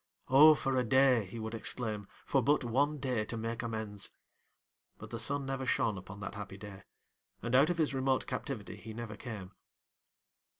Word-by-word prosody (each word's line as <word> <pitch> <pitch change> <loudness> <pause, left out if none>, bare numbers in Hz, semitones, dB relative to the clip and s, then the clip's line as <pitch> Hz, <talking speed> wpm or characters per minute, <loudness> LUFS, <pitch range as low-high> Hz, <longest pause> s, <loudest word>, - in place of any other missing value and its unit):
O 150 +4 +9
for 135 -2 0
a 125 - +3
day 130 -2 +4
(he 100 +5 -9
would 110 0 -4
exclaim), 110 -2 -2 0.2
for 135 - +2
but 145 +4 +3
one 140 +6 +1
day 130 -5 -1
to 115 - -5
make 115 +1 -3
amends! 110 -3 -3 0.9
But - - -10
the 115 - -4
sun 140 +5 -1
never 135 0 -3
shone 110 -4 +2
upon 95 +1 -9
that 95 - -5
happy 100 -1 -7
day, 100 -1 -9 0.6
and 120 +1 -2
out 135 +5 +6
of 175 - 0
his 155 -4 +1
remote 130 -2 +1
captivity - - -5
he 110 -1 -9
never 115 -2 -6
came. 105 -4 -7
115 Hz, 180 wpm, -33 LUFS, 105-135 Hz, 0.9 s, O